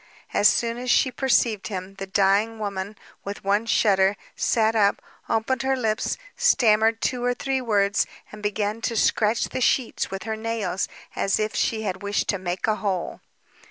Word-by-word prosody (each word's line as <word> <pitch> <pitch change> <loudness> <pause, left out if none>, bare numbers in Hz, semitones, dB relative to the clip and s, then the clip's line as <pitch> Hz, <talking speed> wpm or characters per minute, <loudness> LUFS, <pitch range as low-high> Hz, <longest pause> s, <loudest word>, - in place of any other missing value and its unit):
As 205 - +5
soon 235 0 +1
as 250 0 -4
she 260 - +4
perceived 235 -6 +1
him, 190 -2 -6
the 195 - -5
dying 200 +4 +2
woman, 200 -1 -4 0.3
with 200 +1 -6
one 205 +3 +1
shudder, 195 -3 +3 0.2
sat 225 -1 +1
up, 205 -2 +3 0.3
opened 235 +3 0
her 265 +1 +1
lips, 220 -4 -1 0.2
stammered 225 - +3
two 250 -2 -1
or 245 0 +1
three 270 +1 -1
words, 205 -4 +1 0.2
and 210 - -10
began 210 +1 -2
to 230 0 -2
scratch 215 +1 +2
the 255 - -4
sheets 250 -1 +1
with 195 0 -5
her 220 0 -3
nails 220 -4 -2 0.3
as 195 - +1
if 215 0 -1
she 220 -1 0
had 190 -2 -3
wished 205 0 -1
to 200 - 0
make 180 0 -3
a 215 -1 +1
hole. 190 -4 -3
215 Hz, 175 wpm, -24 LUFS, 200-230 Hz, 0.3 s, As